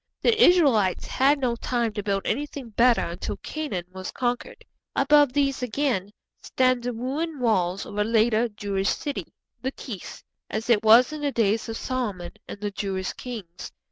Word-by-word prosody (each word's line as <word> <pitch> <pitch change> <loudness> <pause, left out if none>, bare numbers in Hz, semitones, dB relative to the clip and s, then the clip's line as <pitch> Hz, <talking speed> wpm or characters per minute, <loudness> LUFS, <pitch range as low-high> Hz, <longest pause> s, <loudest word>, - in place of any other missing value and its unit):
The 460 0 +4
Israelites 265 - +4
had 280 +3 +3
no 250 -3 0
time 235 -2 -1
to 205 - -3
build 195 -1 -1
anything 285 -3 -3
better 235 +2 +4
until 170 +2 -4
Canaan 295 - -4
was 185 0 -6
conquered. 245 -1 -3 0.3
Above 290 -1 +5
these 275 -2 +1
again 250 -5 -1 0.3
stand 255 -1 +1
the 245 - -1
ruined 275 +6 -3
walls 195 -6 +1
of 205 - -6
a - - +4
later 225 +1 +2
Jewish 200 -2 -2
city, 290 -2 -3 0.3
Lachish, 250 -6 -6 0.3
as 220 +2 -2
it 210 -3 +4
was 230 +6 +6
in 305 - -6
the 290 -1 0
days 225 -2 +1
of 225 - -4
Solomon 210 -9 -3 0.2
and - - -8
the 205 0 -3
Jewish 190 -2 -3
kings. 210 -9 -8
235 Hz, 165 wpm, -25 LUFS, 205-270 Hz, 0.3 s, was